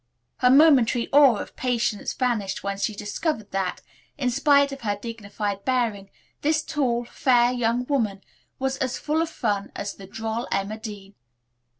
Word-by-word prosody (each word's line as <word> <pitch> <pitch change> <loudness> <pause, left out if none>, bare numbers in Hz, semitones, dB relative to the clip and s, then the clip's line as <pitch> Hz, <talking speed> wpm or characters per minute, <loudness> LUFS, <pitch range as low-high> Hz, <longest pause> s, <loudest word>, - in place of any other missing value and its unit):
Her 250 - +4
momentary 260 -4 +5
awe 280 -4 +7
of - - -7
Patience 240 -4 -1
vanished 220 -7 -1
when 200 0 -3
she 210 +1 -1
discovered 215 +3 -3
that, 190 -2 -2 0.3
in 255 -3 0
spite 280 +2 +4
of 275 - -7
her 205 -3 -1
dignified 205 -3 -5
bearing, 230 -6 -1 0.3
this 310 +1 +1
tall, 245 -5 -1
fair 245 0 +3
young 245 0 0
woman 220 -8 -1 0.3
was 265 0 -1
as 260 -3 -2
full 310 +2 0
of 330 - -1
fun 205 -9 -2
as 200 0 -4
the 195 - -12
droll 225 +4 -4
Emma 200 +3 -2
Dean. 205 -3 -9
235 Hz, 160 wpm, -24 LUFS, 205-265 Hz, 0.3 s, awe